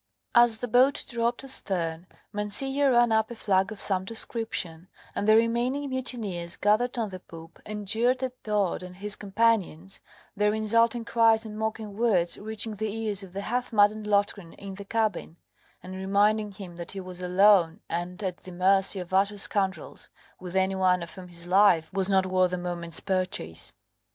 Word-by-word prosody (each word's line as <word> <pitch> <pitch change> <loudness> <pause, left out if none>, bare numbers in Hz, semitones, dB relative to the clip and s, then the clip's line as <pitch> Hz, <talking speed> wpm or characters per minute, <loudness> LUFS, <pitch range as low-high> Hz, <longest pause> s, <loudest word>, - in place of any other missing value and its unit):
As 235 -2 +5
the 245 - -4
boat 255 +4 +3
dropped 235 0 -1
astern, 175 -9 -3 0.3
Mancillo 270 +7 +2
ran 240 -2 +4
up 220 0 +2
a 235 - -7
flag 195 -2 +1
of 215 - -8
some 190 -2 -1
description, 195 -5 -2 0.3
and 205 - -2
the 215 - +7
remaining 240 +5 +1
mutineers 210 -10 -4
gathered 220 +5 +1
on 225 -3 -1
the 185 - -7
poop 165 -1 -13
and 210 -1 -6
jeered 245 +5 +1
at 255 -1 -5
Todd 205 -5 0
and 180 0 -9
his 205 +2 -2
companions; 200 -4 0 0.3
their 210 +1 +2
insulting 230 +2 +1
cries 230 -1 +3
and 215 -1 -7
mocking 220 -1 -4
words 200 -7 +1
reaching 220 0 -5
the 220 0 -2
ears 215 -2 -2
of 190 -2 -10
the 200 - -4
half 245 +4 -2
maddened 210 0 +3
Loftgreen 200 -4 0
in 200 -1 -9
the 200 +1 -9
cabin, 215 -6 -2 0.5
and 185 +1 -8
reminding 205 +2 +1
him 185 -3 -10
that 170 +1 -7
he 195 - -5
was 185 -1 -8
alone 180 -1 +4
and 175 +4 -4
at 185 -2 -3
the 185 - -12
mercy 190 +2 +2
of 180 0 -8
utter 200 +2 +2
scoundrels, 195 -1 0 0.3
with 180 0 -8
any 190 0 +2
one 185 -2 +2
of 170 - -8
whom 185 -2 -10
his 170 -1 -11
life 180 -3 +4
was 195 -1 -1
not 190 -1 +3
worth 185 -1 +2
a - - 0
moment's 175 -2 -3
purchase. 185 - -3
205 Hz, 180 wpm, -27 LUFS, 185-225 Hz, 0.5 s, the